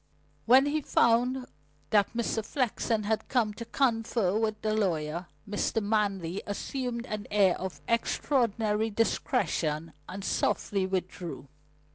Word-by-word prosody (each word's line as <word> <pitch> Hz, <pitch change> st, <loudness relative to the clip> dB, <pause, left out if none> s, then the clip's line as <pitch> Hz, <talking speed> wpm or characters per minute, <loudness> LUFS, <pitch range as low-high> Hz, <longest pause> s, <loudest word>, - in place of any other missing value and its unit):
When 260 Hz, +4 st, +7 dB
he 300 Hz, +2 st, 0 dB
found 250 Hz, +1 st, +2 dB, 0.5 s
that 205 Hz, -2 st, +4 dB
Mr. 225 Hz, -1 st, 0 dB
Flexen 230 Hz, -3 st, 0 dB
had 220 Hz, +1 st, -1 dB
come 230 Hz, -5 st, +1 dB
to 230 Hz, +2 st, -7 dB
confer 225 Hz, -6 st, +1 dB
with 215 Hz, -1 st, 0 dB
the 215 Hz, 0 st, +1 dB
lawyer, 170 Hz, -5 st, -1 dB, 0.2 s
Mr. 205 Hz, +2 st, 0 dB
Manley 200 Hz, -4 st, 0 dB
assumed 240 Hz, +3 st, -3 dB
an 210 Hz, -4 st, -5 dB
air 200 Hz, -3 st, +4 dB
of 180 Hz, -6 st, -5 dB
extraordinary 225 Hz, -3 st, +1 dB
discretion 165 Hz, -, 0 dB, 0.2 s
and 195 Hz, +1 st, -6 dB
softly 195 Hz, -2 st, 0 dB
withdrew. 180 Hz, -5 st, -4 dB
215 Hz, 120 wpm, -29 LUFS, 190-235 Hz, 0.5 s, When